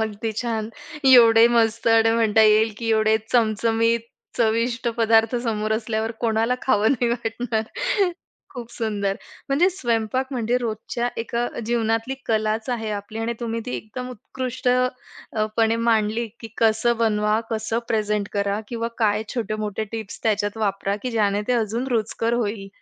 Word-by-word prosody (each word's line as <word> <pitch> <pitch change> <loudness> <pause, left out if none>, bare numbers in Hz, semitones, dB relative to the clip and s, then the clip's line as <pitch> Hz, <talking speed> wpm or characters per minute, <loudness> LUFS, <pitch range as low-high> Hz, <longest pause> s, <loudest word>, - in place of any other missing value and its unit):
अगदी, 220 0 -2
छान, 225 -3 -2 0.4
एवढे 230 -3 +8
मस्त 230 -1 +1
आणि 225 0 +5
म्हणता 220 -1 +3
येईल, 215 +1 +4
की 230 - -4
एवढे 220 0 +3 0.2
चमचमीत 230 0 +2 0.4
चविष्ट 235 +1 +1
पदार्थ 225 0 +3
समोर 215 -2 -1
असल्यावर 220 0 -1
कोणाला 225 +1 +1
खावं 215 -3 +3
नाही 245 -2 0
वाटणार. 225 -1 -2 0.9
खूप 240 -2 -8
सुंदर 205 -4 -2 0.3
म्हणजे 290 +7 +4
स्वयंपाक 240 - -1
म्हणजे 240 -1 0
रोजच्या 235 +1 -3
एका 235 +1 -2 0.2
जीवनातली 225 +2 0
कलाच 220 +1 0
आहे 225 -3 -2
आपली 205 +1 -5
आणि 225 +1 -1
तुम्ही 230 -1 -2
ती 250 - -3
एकदम 250 +4 -7
उत्कृष्ट 255 +2 -4
अ, 250 -3 -1
पणे 225 0 +3
मांडली, 230 0 +1
की 225 - -8
कसं 225 +1 +3
बनवा, 210 -1 +2
कसं 220 0 -1
प्रेझेंट 210 -3 0
करा 200 0 0
किंवा 230 -1 -3
काय 215 -2 +2
छोटे-मोठे 215 -2 -2
टिप्स 220 -3 -6
त्याच्यात 205 -1 0
वापरा, 200 -2 -1
की 255 - -2
ज्याने 205 -3 +1
ते - - +3
अजून 235 +2 -1
रुचकर 230 -1 0
होईल. 210 -4 -2
225 Hz, 145 wpm, -23 LUFS, 215-235 Hz, 0.9 s, एवढे